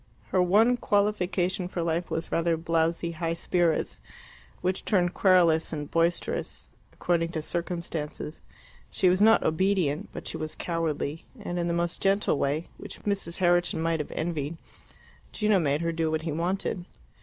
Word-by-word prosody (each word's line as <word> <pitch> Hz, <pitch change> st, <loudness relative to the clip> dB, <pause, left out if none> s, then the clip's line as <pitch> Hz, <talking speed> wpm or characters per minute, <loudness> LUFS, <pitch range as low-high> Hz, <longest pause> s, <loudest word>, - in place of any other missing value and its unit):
Her 185 Hz, -, +3 dB
one 215 Hz, +7 st, +4 dB
qualification 190 Hz, -4 st, +1 dB
for 175 Hz, -2 st, -3 dB
life 165 Hz, +1 st, -1 dB
was 165 Hz, 0 st, -3 dB
rather 165 Hz, 0 st, +1 dB
blowsy 165 Hz, +1 st, 0 dB
high 165 Hz, 0 st, -2 dB
spirits, 170 Hz, -1 st, 0 dB, 0.6 s
which 185 Hz, +1 st, -1 dB
turned 180 Hz, -3 st, +2 dB
querulous 175 Hz, -4 st, +4 dB
or 150 Hz, -2 st, -3 dB
boisterous 165 Hz, +3 st, -1 dB, 0.2 s
according 170 Hz, -1 st, 0 dB
to 155 Hz, -, -2 dB
circumstances. 170 Hz, -3 st, -4 dB, 0.5 s
She 185 Hz, -, +3 dB
was 185 Hz, +2 st, +2 dB
not 225 Hz, +1 st, +6 dB
obedient, 165 Hz, -3 st, +1 dB
but -, -, -7 dB
she -, -, -3 dB
was 155 Hz, 0 st, -5 dB
cowardly, 165 Hz, -2 st, -2 dB
and 175 Hz, -4 st, -4 dB
in 170 Hz, -, 0 dB
the 170 Hz, -, 0 dB
most 170 Hz, 0 st, -2 dB
gentle 195 Hz, -6 st, +2 dB
way, 150 Hz, +4 st, 0 dB
which -, -, -9 dB
Mrs. 195 Hz, -5 st, -2 dB
Herriton 175 Hz, -2 st, +2 dB
might 165 Hz, 0 st, 0 dB
have 150 Hz, -, -4 dB
envied, 160 Hz, -1 st, -2 dB, 0.8 s
Gino 210 Hz, -2 st, +3 dB
made 145 Hz, -2 st, +1 dB
her 170 Hz, 0 st, 0 dB
do 165 Hz, -1 st, 0 dB
what 160 Hz, 0 st, -1 dB
he 165 Hz, -, -2 dB
wanted. 175 Hz, +2 st, -2 dB
170 Hz, 155 wpm, -27 LUFS, 160-185 Hz, 0.8 s, not